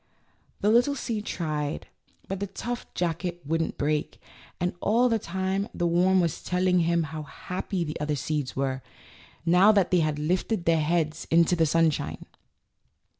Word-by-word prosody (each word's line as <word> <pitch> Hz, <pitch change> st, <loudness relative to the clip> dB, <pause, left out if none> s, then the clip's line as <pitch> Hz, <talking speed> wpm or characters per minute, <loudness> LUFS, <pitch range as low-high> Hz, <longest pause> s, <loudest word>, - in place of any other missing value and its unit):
The 210 Hz, -, +3 dB
little 245 Hz, +5 st, +4 dB
seed 220 Hz, -6 st, -3 dB
tried, 150 Hz, -3 st, -3 dB, 0.4 s
but 195 Hz, 0 st, -4 dB
the 200 Hz, -, -2 dB
tough 240 Hz, +5 st, -5 dB
jacket 175 Hz, 0 st, -2 dB
wouldn't 165 Hz, +2 st, -1 dB
break; 150 Hz, +2 st, -1 dB, 0.4 s
and 180 Hz, 0 st, 0 dB
all 240 Hz, +4 st, +3 dB
the 225 Hz, -1 st, +2 dB
time 190 Hz, +2 st, -2 dB
the 175 Hz, -, 0 dB
worm 180 Hz, +2 st, +3 dB
was 170 Hz, -3 st, 0 dB
telling 180 Hz, 0 st, +2 dB
him 170 Hz, 0 st, +2 dB
how 155 Hz, 0 st, -5 dB
happy 180 Hz, +4 st, -4 dB
the 150 Hz, -2 st, -5 dB
other 150 Hz, 0 st, 0 dB
seeds 145 Hz, -1 st, -2 dB
were, 135 Hz, -1 st, -1 dB, 0.6 s
now 180 Hz, +5 st, +6 dB
that 200 Hz, -4 st, +2 dB
they 180 Hz, -, +4 dB
had 155 Hz, -2 st, 0 dB
lifted 175 Hz, +5 st, -1 dB
their 165 Hz, -1 st, +3 dB
heads 155 Hz, 0 st, 0 dB
into 170 Hz, +1 st, +4 dB
the 165 Hz, -2 st, +2 dB
sunshine. 165 Hz, -1 st, +1 dB
170 Hz, 160 wpm, -27 LUFS, 155-190 Hz, 0.6 s, now